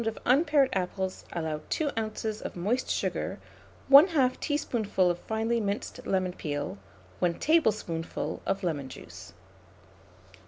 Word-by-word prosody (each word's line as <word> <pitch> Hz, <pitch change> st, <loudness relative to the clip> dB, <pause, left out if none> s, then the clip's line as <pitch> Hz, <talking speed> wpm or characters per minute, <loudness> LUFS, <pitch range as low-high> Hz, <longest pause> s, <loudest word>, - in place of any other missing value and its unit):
of 225 Hz, -, -2 dB
unpared 285 Hz, +1 st, +4 dB
apples 190 Hz, 0 st, -2 dB
allow 160 Hz, -3 st, -3 dB
2 300 Hz, -3 st, 0 dB
oz. 215 Hz, -1 st, -3 dB
of -, -, -6 dB
moist 210 Hz, +9 st, -1 dB
sugar, -, -, -1 dB, 0.5 s
1/2 280 Hz, -3 st, +7 dB
teaspoonful 220 Hz, -, +1 dB
of 175 Hz, -, -5 dB
finely 225 Hz, +3 st, -1 dB
minced 200 Hz, 0 st, -4 dB
lemon 185 Hz, -1 st, 0 dB
peel, 145 Hz, -, -4 dB, 0.4 s
1 175 Hz, -1 st, +1 dB
tablespoonful 215 Hz, -, 0 dB
of 195 Hz, 0 st, -1 dB
lemon 145 Hz, -6 st, -2 dB
juice. 90 Hz, -4 st, -11 dB
205 Hz, 120 wpm, -28 LUFS, 170-250 Hz, 0.5 s, 1/2